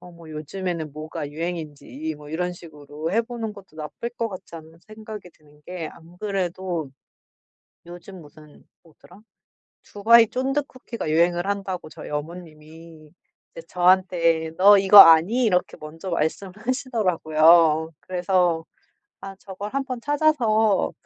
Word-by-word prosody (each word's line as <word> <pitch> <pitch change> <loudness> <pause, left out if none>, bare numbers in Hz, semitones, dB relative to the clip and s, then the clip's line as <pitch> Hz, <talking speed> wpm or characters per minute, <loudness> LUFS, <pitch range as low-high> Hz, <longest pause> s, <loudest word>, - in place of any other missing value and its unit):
어 180 - -13
뭐 170 -1 -15
요즘에는 160 0 -5
뭐가 155 -1 -7
유행인지 160 -2 -6
이 155 +6 -5
뭐 150 0 -13
이런 180 +3 -2
식으로 155 -2 -8
해 225 - +3
보는 230 -2 -6
것도 195 -6 -16
나쁠 155 +9 -6
것 230 -1 -3
같지 185 -4 -11
않은 160 0 -14
생각이 215 -3 -10
드는 150 -2 -25
게 175 -3 -6
안 170 +1 -17
그래도 185 -6 -3 1.0
요즘 175 +2 -11
무슨 150 0 -17 0.2
뭐더라? 175 +3 -19 0.6
두바이 225 +3 +4
쫀득 270 +5 -2
쿠키가 235 -8 -7
유행을 175 +3 +1
한다고 195 -4 -4
저희 160 -1 -11
어머님이 155 0 -9 0.4
이제 165 - -10
저한테 175 -3 +2
"너 200 +2 +7
이거 195 +1 +6
아니?" 170 +9 +7
이렇게 180 -5 0
먼저 160 +4 -9
말씀을 170 +3 -2
하시더라고요. 170 - +2
그래서 180 -2 0 0.6
'아 195 0 -8
저걸 200 +1 -8
1 275 0 -1
번 255 -3 -6
찾아서 235 -9 +1
175 Hz, 290 characters per minute, -23 LUFS, 160-200 Hz, 1.0 s, 너